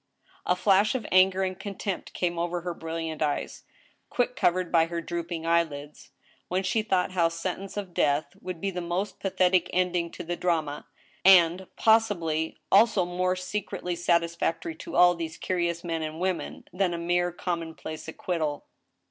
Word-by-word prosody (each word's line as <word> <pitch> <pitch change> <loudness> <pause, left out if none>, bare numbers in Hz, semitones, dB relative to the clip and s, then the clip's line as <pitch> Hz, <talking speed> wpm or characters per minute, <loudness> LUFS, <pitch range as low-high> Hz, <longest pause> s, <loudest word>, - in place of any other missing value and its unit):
A 180 - +3
flash 200 +5 +3
of 250 - -2
anger 185 +1 +5
and 185 -1 -3
contempt 200 -1 -5
came 175 -1 -1
over 175 +1 -1
her 175 0 -3
brilliant 165 -1 -5
eyes, 150 -2 -2 0.4
quick 245 0 0
covered 180 0 +1
by 165 -1 +5
her 170 0 -3
drooping 170 0 -4
eyelids, 155 -3 -1 0.4
when 185 +2 -1
she 195 +4 +1
thought 190 -4 0
how 170 -3 +2
sentence 185 +4 -5
of 195 -4 -5
death 145 -1 +2 0.2
would 180 -2 -6
be 195 +3 -2
the 180 -1 -4
most 175 +4 -3
pathetic 185 -2 +2
ending 180 -2 +1
to 175 - -6
the 175 +1 -3
drama, 160 -5 -1 0.4
and, 180 -1 +6
possi 220 -3 +4
bly, 160 -1 -2 0.2
also 205 -2 +5
more 180 +1 0
secretly 185 -1 -4
satisfactory 170 -1 0
to - - -8
all 175 0 +7
these 165 -2 -5
curious 170 -2 -1
men 165 -2 -2
and 155 +1 -5
women, 185 -1 -3
than 180 -2 +1
a - - -3
mere 175 +1 +1
commonplace 165 -3 -5
acquittal. 160 -3 -3
175 Hz, 165 wpm, -27 LUFS, 165-185 Hz, 0.4 s, all